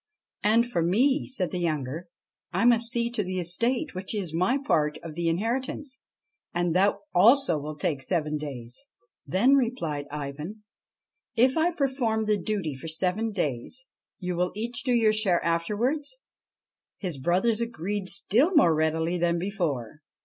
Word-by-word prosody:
' - - -66
And 225 +3 +4
for 240 -8 -1
me,' 255 - +2
said 190 -9 +1
the 180 - -2
younger, 155 0 -2 0.2
' - - -65
I - - +1
must 235 -1 +7
see 235 0 0
to 220 -3 -1
the 185 0 -4
estate 235 - 0
which 190 +3 -5
is 185 -6 -2
my 185 +11 +2
part 155 - 0
of 165 -2 -7
the 170 +1 -1
inheritance, 255 - -2 0.6
and 175 -1 0
that 195 +2 +4 0.2
also 210 - +5
will 150 +1 -6
take 150 -2 -1
seven 150 0 0
days.' 130 - -5 0.2
' - - -49
Then,' 235 +9 +3
replied 175 - 0
Ivan, 150 +8 -6 0.4
' - - -64 0.3
if 255 +3 +4
I 325 +2 +3
perform 260 -8 0
the 210 -1 +1
duty 190 -6 -2
for 135 +5 -8
seven 185 +7 +1
days, 175 - -3 0.3
you 180 -2 -3
will 180 +1 0
each 235 +3 -3
do 255 - 0
your 225 -3 +4
share 200 -5 +1
afterwards? 215 - -1 0.4
' - - -66
His 175 -8 -3
brothers 190 - +1
agreed 205 -4 -3
still 245 - +2
more 225 - +6
readily 160 +2 0
than 170 0 +1
before. 160 - -3
190 Hz, 170 wpm, -27 LUFS, 165-235 Hz, 0.6 s, must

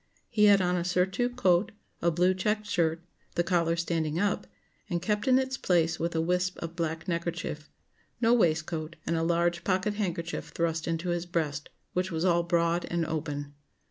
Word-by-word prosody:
He 210 -2 +4
had 200 -2 +6
on 180 0 +1
a 175 - 0
surtout 190 +7 0
coat, 185 -4 +3 0.3
a 170 - +3
blue 180 +3 +3
checked 210 +3 -1
shirt; 170 -4 0 0.3
the 175 - +2
collar 170 -2 +2
standing 165 -2 -1
up, 195 - 0 0.4
and 175 - 0
kept 210 +7 -1
in 255 -1 +6
its 260 0 -1
place 170 -3 +1
with 170 0 -2
a 160 - +2
wisp 180 +2 0
of 170 0 -6
black 165 0 -3
neckerchief; 170 -3 -3 0.5
no 230 0 +4
waistcoat; 160 -5 +1
and 170 - 0
a 165 - 0
large 170 +1 +1
pocket 190 +2 +1
handkerchief 170 -5 -3
thrust 165 -1 -1
into 165 +2 -1
his 175 0 -1
breast, 150 -4 -2 0.2
which 180 +1 0
was 165 +2 -1
all 170 -2 +4
broad 170 0 +1
and 170 -1 0
open. 145 -2 -4
170 Hz, 180 wpm, -29 LUFS, 165-185 Hz, 0.5 s, had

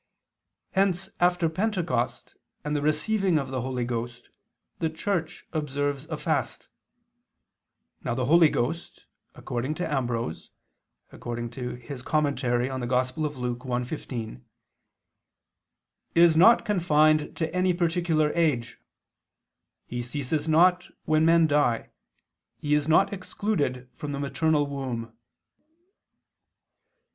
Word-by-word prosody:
Hence 190 -1 +1
after 175 -1 +3
Pentecost 175 - -2 0.3
and 150 0 -2
the 145 - 0
receiving 175 +5 +1
of 135 -3 -2
the 130 -2 -2
Holy 125 -1 -2
Ghost 120 0 -5 0.5
the 160 - 0
Church 165 0 -3
observes 145 -2 -2
a - - -5
fast. - - -2 1.3
Now 120 - -1
the 130 -1 -1
Holy 165 +3 +6
Ghost, 155 +8 -3 0.3
according 130 +5 -3
to 175 +1 -2
Ambrose 120 - -2 0.6
(Super - - -10
Luc. 120 0 -4
1:15), 125 - -2 1.7
"is 170 -1 +6
not 225 +9 +6
confined 155 -6 +2
to 160 -1 -2
any 185 0 +3
particular 170 -3 +1
age; 150 -9 0 1.1
He 120 0 -4
ceases 145 +5 -3
not 180 +3 +4 0.2
when 155 0 +3
men 165 0 +5
die, 145 -6 +1 0.7
He 150 0 -1
is 150 0 +2
not 165 +6 +4
excluded 185 -10 -2
from 145 -1 -6
the 140 - -3
maternal 150 +1 +1
womb." 130 -5 -5
150 Hz, 100 wpm, -26 LUFS, 125-165 Hz, 1.7 s, Holy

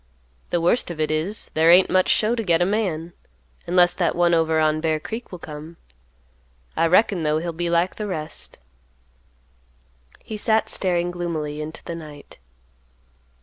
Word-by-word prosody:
The 175 - 0
worst 175 +8 +1
of 170 -2 -7
it 155 0 0
is, 165 +8 -2
there 160 +1 +3
ain't 180 +2 +7
much 185 0 +2
show 220 +2 +3
to 235 - -1
get 170 -4 +2
a 175 - +3
man; 180 -5 -2 0.5
unless 175 0 +4
that 175 - 0
one 175 0 +3
over 160 -1 +2
on 155 0 +1
Bear 160 -1 0
Creek 225 +9 -7
will 180 - -6
come. 155 0 -10 1.0
I 165 - +2
reckon, 185 +1 +3
though, 155 0 +1
he'll 170 +1 -3
be 170 +1 -2
like 170 +2 +1
the 210 - -4
rest." 155 -5 -6 1.7
He 215 - -6
sat 220 +1 +1
staring 175 -2 0
gloomily 160 -4 -4
into 155 +1 -7
the 170 - -6
night. 150 - -11
170 Hz, 165 wpm, -22 LUFS, 155-185 Hz, 1.7 s, ain't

